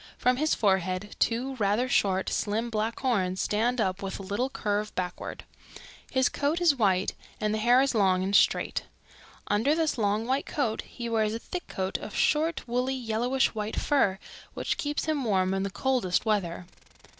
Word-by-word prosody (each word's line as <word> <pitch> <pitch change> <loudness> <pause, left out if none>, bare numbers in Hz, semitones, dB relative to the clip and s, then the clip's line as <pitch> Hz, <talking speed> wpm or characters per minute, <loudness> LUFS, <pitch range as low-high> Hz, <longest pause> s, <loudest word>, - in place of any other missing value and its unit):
From 250 0 +2
his 310 +3 +2
forehead 190 -1 0
two 245 +4 0
rather 210 +3 +1
short, 190 -6 +1
slim, 225 +3 -1
black 220 +1 -2
horns 190 -8 0
stand 235 +4 +1
up 190 -3 0
with 195 -1 -4
a - - -7
little 205 +7 -1
curve 210 -4 -2
backward. 180 -1 -4 0.7
His 260 -1 +2
coat 295 +4 0
is 340 -5 +4
white 195 -6 +2 0.3
and 215 0 0
the 215 - -1
hair 240 +4 +5
is 275 - 0
long 190 -4 +3
and 195 +2 0
straight. - - +3 0.6
Under 225 +9 +2
this 320 -6 0
long 210 +1 +1
white 265 +3 -1
coat 245 -7 -1
he 235 -2 -7
wears 220 -1 +1
a - - -1
thick 355 +8 -6
coat 190 0 -3
of 215 - -8
short, 310 -1 +1
woolly, 250 +2 0
yellowish 245 +2 0
white 215 0 -3
fur 235 -10 +2 0.4
which - - -2
keeps 290 0 -1
him 310 -3 0
warm 190 -4 +1
in 195 - 0
the 195 - -1
coldest 195 0 0
weather. 185 -5 -1
220 Hz, 180 wpm, -28 LUFS, 195-260 Hz, 0.7 s, hair